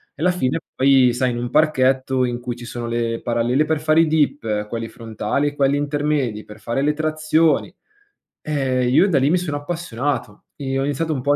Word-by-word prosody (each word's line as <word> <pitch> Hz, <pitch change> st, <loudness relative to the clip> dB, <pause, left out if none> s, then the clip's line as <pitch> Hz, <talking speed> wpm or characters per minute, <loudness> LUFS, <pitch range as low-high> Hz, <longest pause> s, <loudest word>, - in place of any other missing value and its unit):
e 150 Hz, -, -11 dB
alla 180 Hz, +2 st, +3 dB
fine 130 Hz, -8 st, -1 dB, 0.2 s
poi, 130 Hz, -2 st, +4 dB
sai, 125 Hz, +1 st, 0 dB
in 120 Hz, -, -4 dB
un 120 Hz, 0 st, -3 dB
parchetto 130 Hz, -4 st, +2 dB
in 120 Hz, -1 st, -3 dB
cui 120 Hz, -1 st, -5 dB
ci 120 Hz, 0 st, -10 dB
sono 120 Hz, 0 st, -5 dB
le 115 Hz, 0 st, -2 dB
parallele 120 Hz, +4 st, +1 dB
per 155 Hz, -1 st, 0 dB
fare 155 Hz, +1 st, +3 dB
i 165 Hz, -, +2 dB
dip, 125 Hz, -9 st, 0 dB
quelli 115 Hz, +1 st, -4 dB
frontali 115 Hz, +4 st, -2 dB
e 145 Hz, -, -13 dB
quelli 140 Hz, 0 st, +2 dB
intermedi 145 Hz, -6 st, -1 dB
per 105 Hz, +1 st, -13 dB
fare 115 Hz, +5 st, -2 dB
le 150 Hz, +1 st, +2 dB
trazioni, 155 Hz, +1 st, +1 dB, 0.7 s
e 130 Hz, -4 st, 0 dB
io 145 Hz, +10 st, +5 dB
da 150 Hz, -7 st, +3 dB
lì 135 Hz, +2 st, +2 dB
mi 180 Hz, -, +3 dB
sono 155 Hz, -5 st, -3 dB
appassionato 145 Hz, -, -4 dB
e 135 Hz, -1 st, -3 dB
ho -, -, 0 dB
iniziato 155 Hz, +3 st, -1 dB
un 135 Hz, -, -3 dB
po' 145 Hz, +3 st, +2 dB
135 Hz, 205 wpm, -21 LUFS, 120-150 Hz, 0.7 s, io